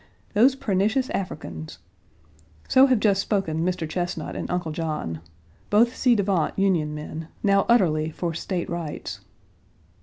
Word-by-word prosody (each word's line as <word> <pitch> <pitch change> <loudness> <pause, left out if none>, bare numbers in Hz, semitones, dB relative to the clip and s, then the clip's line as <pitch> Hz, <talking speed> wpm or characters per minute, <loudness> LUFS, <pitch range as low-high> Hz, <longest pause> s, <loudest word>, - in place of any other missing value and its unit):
Those 250 +6 +5
pernicious 220 +5 0
Africans! 85 - -5 0.9
So 265 +1 +6
have 255 -4 +3
just 200 -2 +3
spoken 165 -7 -1
Mr. 180 -2 -1
Chesnut 175 +2 -3
and - - -4
Uncle 175 -2 -2
John, 155 - -3 0.5
both 235 +4 +4
ci 245 -2 +5
devant 195 -6 0
Union 170 -6 +1
men, 155 +1 -6 0.2
now 200 -1 +3
utterly 160 -9 +3
for 170 +1 -3
State 175 +2 -3
rights. 170 -3 -5
180 Hz, 130 wpm, -24 LUFS, 160-205 Hz, 0.9 s, So